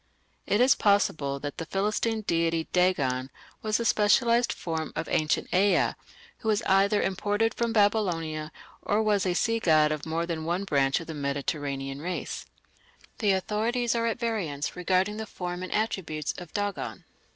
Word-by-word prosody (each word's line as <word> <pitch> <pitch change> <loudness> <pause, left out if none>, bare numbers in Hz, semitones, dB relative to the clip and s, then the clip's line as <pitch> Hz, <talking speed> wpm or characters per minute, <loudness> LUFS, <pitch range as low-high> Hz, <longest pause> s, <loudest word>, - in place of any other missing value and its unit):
It 205 - +2
is 260 +2 +6
possible 155 -9 +1
that 145 -1 -5
the 165 - -3
Philistine 215 +4 0
deity 165 -4 0
Dagon 140 -8 +1 0.3
was 215 0 0
a 235 - -2
specialized 235 +3 +3
form 160 -2 -4
of - - -3
ancient 155 -1 0
Ea, 195 +2 +4 0.5
who 220 - -7
was 215 -2 +2
either 200 +2 +3
imported 205 +4 0
from 235 -1 -1
Babylonia 175 -8 +1 0.3
or 210 +2 +1
was 205 -3 +2
a 180 - 0
sea 230 +4 +1
god 155 -6 +4
of 155 +1 -4
more 165 +1 -1
than 165 -2 -3
one 175 +4 -1
branch 140 -6 +2
of - - -8
the 160 - -6
Mediterranean 140 -1 -3
race. 180 +3 -4 0.7
The 205 -3 +3
authorities 225 +5 0
are 230 -1 0
at 230 - -1
variance 200 - -2
regarding 185 +3 +1
the 220 0 -5
form 180 -3 -5
and 185 - -6
attributes 180 -8 -1
of 175 -3 -10
Dagan. 205 -1 -3
185 Hz, 165 wpm, -27 LUFS, 155-215 Hz, 0.7 s, is